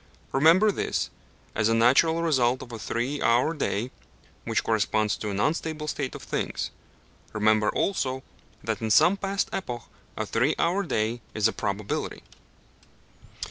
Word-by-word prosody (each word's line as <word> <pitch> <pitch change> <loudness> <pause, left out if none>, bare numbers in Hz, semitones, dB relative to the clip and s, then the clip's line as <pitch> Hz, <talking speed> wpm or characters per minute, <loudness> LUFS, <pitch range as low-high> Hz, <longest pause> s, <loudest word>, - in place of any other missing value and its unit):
Remember 165 +10 +5
this, - - -2 0.4
as 105 0 +1
a 115 - +3
natural 150 +8 +4
result 130 -6 +2
of 120 - -12
a 115 - -6
three 125 +7 -2
hour 120 +7 +3
day, 125 -5 -2 0.5
which - - 0
corresponds 110 -1 +1
to 105 - -4
an 100 0 -3
unstable 155 +3 -1
state 140 -3 -3
of - - -9
things; - - -3 0.6
remember 110 0 +3
also 130 -9 -1 0.4
that - - -2
in 110 - -1
some 160 - +6
past 195 0 -1
epoch 120 -10 -4 0.3
a 110 - -1
three 125 +8 +1
hour 180 +4 +1
day 120 - -1
is 110 0 +3
a 110 - -2
probability. 100 0 -3
125 Hz, 145 wpm, -26 LUFS, 110-160 Hz, 0.6 s, some